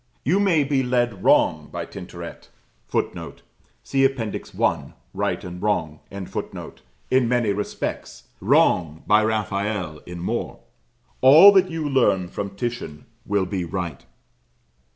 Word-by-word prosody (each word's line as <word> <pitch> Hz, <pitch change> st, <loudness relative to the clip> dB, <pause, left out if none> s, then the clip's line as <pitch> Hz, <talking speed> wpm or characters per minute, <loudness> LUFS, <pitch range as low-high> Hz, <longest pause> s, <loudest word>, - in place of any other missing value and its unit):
You 180 Hz, +8 st, +2 dB
may 180 Hz, -7 st, +3 dB
be 140 Hz, -1 st, +1 dB
led 120 Hz, -6 st, 0 dB
wrong -, -, +3 dB
by -, -, -4 dB
Tintoret -, -, -9 dB, 0.4 s
[Footnote: -, -, -4 dB, 0.4 s
See 135 Hz, -1 st, +1 dB
Appendix 130 Hz, -6 st, -1 dB
I. -, -, 0 dB, 0.2 s
"Right -, -, -2 dB
and 90 Hz, 0 st, -8 dB
Wrong."] 80 Hz, -8 st, -1 dB, 1.1 s
in 130 Hz, -2 st, +3 dB
many 120 Hz, -4 st, +1 dB
respects, 105 Hz, +1 st, -5 dB, 0.2 s
wrong 80 Hz, -3 st, +2 dB
by 105 Hz, +1 st, +4 dB
Raphael 100 Hz, -6 st, -2 dB
in 90 Hz, 0 st, -7 dB
more; 85 Hz, -, -3 dB, 0.6 s
all 155 Hz, +10 st, +9 dB
that 190 Hz, -2 st, +4 dB
you 165 Hz, -3 st, -3 dB
learn 100 Hz, -10 st, +2 dB
from 100 Hz, +1 st, -5 dB
Titian 115 Hz, -9 st, -5 dB, 0.2 s
will 100 Hz, -1 st, +1 dB
be 90 Hz, 0 st, -3 dB
right. 85 Hz, -4 st, -5 dB
105 Hz, 125 wpm, -23 LUFS, 90-130 Hz, 1.1 s, all